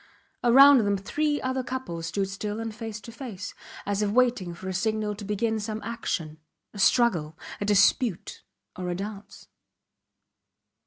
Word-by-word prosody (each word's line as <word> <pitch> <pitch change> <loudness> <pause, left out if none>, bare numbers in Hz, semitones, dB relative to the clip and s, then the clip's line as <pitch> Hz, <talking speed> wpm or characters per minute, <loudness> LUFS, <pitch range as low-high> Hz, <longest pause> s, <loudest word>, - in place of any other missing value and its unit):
Around 270 +3 +8
them 205 -2 +1
three 295 +9 -1
other 260 0 -1
couples 245 -11 -5
stood 195 +3 -1
still 205 +2 -4
and 225 -1 -4
face 215 0 -6
to 230 - -10
face, 225 -5 -7 0.3
as 205 0 -1
if 210 - +1
waiting 240 -5 +2
for 185 - -9
a 190 - -2
signal 215 +2 -1
to 205 +1 -9
begin 215 +2 -1
some 215 +1 -4
action 165 -9 -4 0.3
a 205 - -9
struggle, 175 -9 +3 0.2
a 205 - -2
dispute, 210 0 +2 0.3
or 180 -1 -4
a 175 - -1
dance. 200 +2 -8
210 Hz, 155 wpm, -26 LUFS, 195-235 Hz, 0.3 s, Around